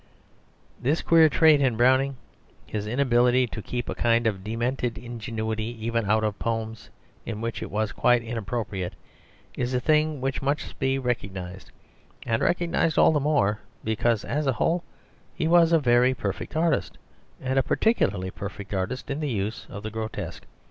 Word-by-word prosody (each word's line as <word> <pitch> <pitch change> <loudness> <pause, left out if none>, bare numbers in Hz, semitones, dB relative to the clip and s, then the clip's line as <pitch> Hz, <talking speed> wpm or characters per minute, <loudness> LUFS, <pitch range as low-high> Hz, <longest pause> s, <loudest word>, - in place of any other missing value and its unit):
This 145 +6 +1
queer 165 -1 +6
trait 155 -1 +5
in 125 -5 +2
Browning, 130 +2 +3 0.5
his 105 -1 -4
inability 125 0 +3
to 110 -2 -6
keep 120 +3 -4
a - - -2
kind 115 0 +2
of 100 -4 -1
demented 120 +2 -2
ingenuity 115 -1 -4
even 115 -3 0
out 110 +1 +3
of 105 -2 -2
poems 115 -2 -3 0.3
in 110 -2 -5
which 115 0 -3
it - - -5
was 110 0 -1
quite 120 -1 +3
inappropriate, 110 -4 -3 0.6
is 125 +1 -1
a - - +2
thing 155 +2 +2
which 135 +1 -2
must 140 +2 -2
be 135 0 +1
recognised, 95 -7 -4 0.6
and 115 -2 0
recognised 170 -2 +1
all - - +6
the 150 - +2
more 135 -8 +1 0.2
because 110 0 0
as 150 0 -1
a 135 - +3
whole 170 +8 0 0.5
he 160 - 0
was 170 0 +5
a 165 - +6
very 125 -2 +3
perfect 100 +4 -4
artist, 160 -3 0 0.4
and 130 +1 0
a - - +4
particularly 100 - +1
perfect 100 +1 -7
artist 95 +9 -3
in 140 - -2
the 150 -2 -2
use 105 -1 -3
of 105 - -8
the 110 - -4
grotesque. 110 0 -5
120 Hz, 165 wpm, -26 LUFS, 110-135 Hz, 0.6 s, queer